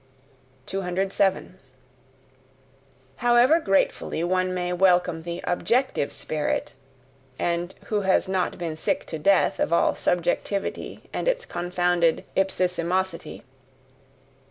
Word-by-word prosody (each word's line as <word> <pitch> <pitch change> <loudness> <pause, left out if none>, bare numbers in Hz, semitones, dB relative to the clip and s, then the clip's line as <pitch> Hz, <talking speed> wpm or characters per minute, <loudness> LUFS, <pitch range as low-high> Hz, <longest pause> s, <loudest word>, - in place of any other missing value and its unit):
207. 190 0 -1 1.6
However 245 +6 +5
gratefully 195 - 0
one 185 +1 +1
may 180 -1 -2
welcome 180 -2 +3
the 170 +1 -5
OBJECTIVE 230 - 0
spirit 155 -1 -2 0.6
and 175 +1 -2
who 210 -1 0
has 190 0 +2
not 190 -1 -1
been 165 -3 -4
sick 155 - -1
to 160 - -6
death 195 +5 +3
of - - 0
all 170 - +3
subjectivity 175 +3 -2
and - - -3
its - - +1
confounded 175 - 0
IPSISIMOSITY! 185 -1 -1
180 Hz, 100 wpm, -25 LUFS, 175-195 Hz, 1.6 s, However